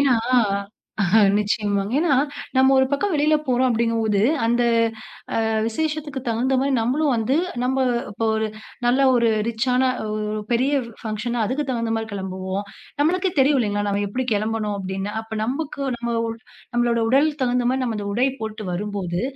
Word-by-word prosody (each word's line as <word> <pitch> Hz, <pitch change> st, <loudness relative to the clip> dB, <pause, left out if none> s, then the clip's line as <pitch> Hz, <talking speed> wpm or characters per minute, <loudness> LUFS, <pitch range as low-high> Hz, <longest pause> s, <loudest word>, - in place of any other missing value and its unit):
ஏன்னா 270 Hz, -4 st, +4 dB, 1.2 s
நிச்சயமாங்க 205 Hz, -1 st, 0 dB
ஏன்னா, 315 Hz, -2 st, +2 dB, 0.4 s
நம்ம 265 Hz, +1 st, +5 dB
ஒரு 265 Hz, 0 st, +4 dB
பக்கம் 375 Hz, +7 st, 0 dB
வெளியில 305 Hz, +1 st, +3 dB
போறோம் 255 Hz, 0 st, +2 dB
அப்பிடீங்கம்போது, 225 Hz, -3 st, +1 dB, 0.3 s
அந்த 240 Hz, +1 st, +2 dB, 0.9 s
அ -, -, 0 dB, 0.2 s
விசேஷத்துக்கு 300 Hz, +3 st, -2 dB
தகுந்தமாரி 260 Hz, +4 st, +1 dB
நம்மளும் 275 Hz, +6 st, +1 dB
வந்து, 230 Hz, +4 st, +1 dB, 0.3 s
நம்ம 265 Hz, +1 st, +1 dB, 0.3 s
இப்ப 210 Hz, -, -5 dB
ஒரு 220 Hz, 0 st, 0 dB, 0.4 s
நல்ல 250 Hz, +3 st, +3 dB
ஒரு 235 Hz, -1 st, +3 dB, 0.2 s
ரிச்சான 250 Hz, +3 st, +1 dB, 0.2 s
ஒ -, -, -3 dB, 0.3 s
ஒ -, -, -3 dB
பெரிய 255 Hz, +4 st, +2 dB, 0.3 s
பங்ஷன்னா 230 Hz, +2 st, -2 dB
அதுக்கு 265 Hz, +7 st, -1 dB
தகுந்தமாரி 225 Hz, -2 st, -1 dB
கிளம்புவோம். 190 Hz, 0 st, -4 dB, 0.4 s
நம்மளுக்கே 365 Hz, +4 st, +2 dB
தெரியும் 270 Hz, 0 st, +4 dB
இல்லேங்களா! 205 Hz, -2 st, 0 dB
நம்ம 200 Hz, 0 st, 0 dB
எப்பிடி 255 Hz, +6 st, -3 dB
கெளம்பணும் 215 Hz, 0 st, -1 dB
அப்பிடீன்னு. 195 Hz, +1 st, -4 dB
அப்ப 220 Hz, -1 st, -7 dB
நமக்கு 280 Hz, +4 st, -3 dB, 0.2 s
நம்ம 235 Hz, 0 st, -2 dB
ஒ -, -, -1 dB, 0.5 s
நம்மளோட 240 Hz, -1 st, +2 dB
உடலுக்கு 290 Hz, +3 st, +2 dB
தகுந்தமாரி 250 Hz, +1 st, +1 dB
நம்ம 230 Hz, -3 st, -2 dB
அந்த 200 Hz, -, -4 dB
உடை 250 Hz, +5 st, +2 dB
போட்டு 215 Hz, -1 st, -5 dB
வரும் 205 Hz, +3 st, -3 dB
போது, 175 Hz, -1 st, -2 dB
235 Hz, 150 wpm, -22 LUFS, 215-265 Hz, 1.2 s, நம்ம